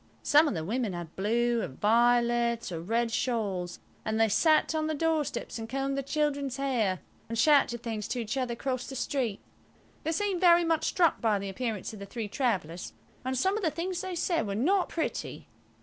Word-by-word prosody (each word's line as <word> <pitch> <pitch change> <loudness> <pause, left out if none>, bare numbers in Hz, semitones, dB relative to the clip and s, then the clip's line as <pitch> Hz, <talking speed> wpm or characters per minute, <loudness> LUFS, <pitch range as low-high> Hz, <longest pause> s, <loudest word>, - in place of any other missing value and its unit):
Some 300 +2 +5
of 255 - -1
the 160 -1 -3
women 225 0 -1
had 175 -2 -7
blue, 235 +4 +1
or - - -2
violet 235 - +2
or 165 -2 -4
red 230 +6 0
shawls, 200 -8 -1 0.3
and 220 0 -1
they 225 0 +4
sat 310 +9 +3
on 310 -1 0
the 315 - -1
doorsteps 315 -5 -1
and 225 0 -6
combed 275 +2 -1
their 275 - -1
children's 280 -2 -1
hair, 235 -9 0 0.3
and 230 - -3
shouted 245 -3 +4
things 220 -4 -3
to 250 - -2
each 230 +2 -3
other 255 -3 -1
across 255 +1 -3
the 270 - -7
street. 250 -5 -2 0.6
They 320 - 0
seemed 380 +1 -1
very 345 -1 +6
much 330 -1 +1
struck 340 -3 +2
by 220 -3 +2
the 195 0 -4
appearance 220 0 -3
of 215 - -9
the 200 - -8
three 220 +1 -4
travellers, 190 - -2 0.3
and 260 +1 -2
some 380 - +2
of - - -8
the 325 - +3
things 350 +3 -3
they 375 -1 -4
said 335 - 0
were 200 - -2
not 360 - +2
pretty. 325 - -4
240 Hz, 200 wpm, -29 LUFS, 220-300 Hz, 0.6 s, very